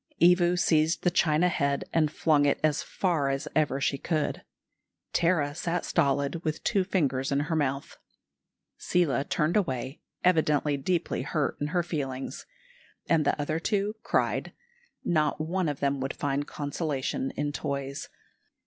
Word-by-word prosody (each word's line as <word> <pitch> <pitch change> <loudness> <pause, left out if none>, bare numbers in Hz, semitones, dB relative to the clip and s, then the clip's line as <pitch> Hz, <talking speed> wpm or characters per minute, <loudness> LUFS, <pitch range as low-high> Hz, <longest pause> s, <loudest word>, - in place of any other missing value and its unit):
Evu 175 0 +5
seized 160 -1 +2
the 175 - +3
china 160 0 +3
head 140 -5 0
and 155 -2 +3
flung 150 -3 +3
it 140 - +1
as 155 -2 +2
far 165 -7 0
as 135 +3 -2
ever 150 -3 +2
she 140 0 0
could. 155 -3 -1 0.7
Tara 165 -4 +2
sat 170 +2 -2
stolid, 140 +1 +1
with 155 -1 -2
two 195 - +2
fingers 140 -9 0
in 140 +1 +2
her 150 +3 -2
mouth. 140 -2 -2 0.8
Seela 165 -6 +1
turned 155 +3 0
away, 135 - -1 0.2
evidently 150 -4 +3
deeply 170 +5 -1
hurt 150 -4 -1
in 145 - 0
her 175 +3 0
feelings, 135 -6 -4 0.6
and 160 -3 +3
the - - +1
other 155 +2 -1
two 205 +3 0
cried. - - 0 0.5
Not 155 -4 +1
one 170 +2 -1
of 145 - -5
them 140 -1 +1
would 135 +1 -3
find 145 0 -1
consolation 150 - -2
in 145 0 -1
toys. 140 -1 -4
150 Hz, 150 wpm, -28 LUFS, 140-170 Hz, 0.8 s, Evu